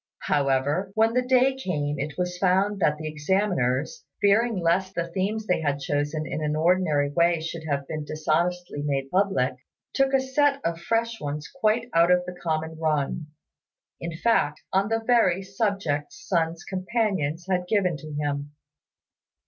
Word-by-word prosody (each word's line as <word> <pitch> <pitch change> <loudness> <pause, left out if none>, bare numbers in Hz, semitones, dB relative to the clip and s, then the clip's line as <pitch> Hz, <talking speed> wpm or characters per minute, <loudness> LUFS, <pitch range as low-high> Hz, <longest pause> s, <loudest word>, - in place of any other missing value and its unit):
However, 145 +7 +1
when 225 +1 +3
the 250 - +3
day 255 +1 +3
came 150 - -2
it 145 +1 -4
was 180 0 -2
found 195 +2 +2
that 150 -4 +2
the 155 0 -5
examiners, 155 - 0 0.2
fearing 220 +2 +3
lest 185 +2 +1
the 170 - 0
themes 195 +5 -2
they 180 -5 +1
had 145 -2 0
chosen 145 +2 -1
in 155 - -4
an 150 0 0
ordinary 155 -3 +2
way 170 +1 +3
should 160 0 -6
have 140 -1 -1
been 155 -1 -4
dishonestly 155 +2 -1
made 135 -2 -2
public, 185 -10 +1 0.4
took 270 -1 +2
a - - +5
set 275 +2 +2
of 165 0 -1
fresh 230 +3 -1
ones 150 +1 -4
quite 230 -2 +1
out 170 +1 +5
of 180 0 +4
the 180 - -6
common 160 -2 -3
run 155 0 -1 0.7
in 165 -1 -5
fact, 195 -8 +1
on 195 +2 +2
the 225 0 0
very 195 -7 +3
subjects 195 -7 -2
Sun's 165 -1 0
companions 185 -5 -1
had 180 -1 0
given 185 -4 +2
to 155 +2 -9
him. 145 0 -3
175 Hz, 160 wpm, -25 LUFS, 150-200 Hz, 0.7 s, a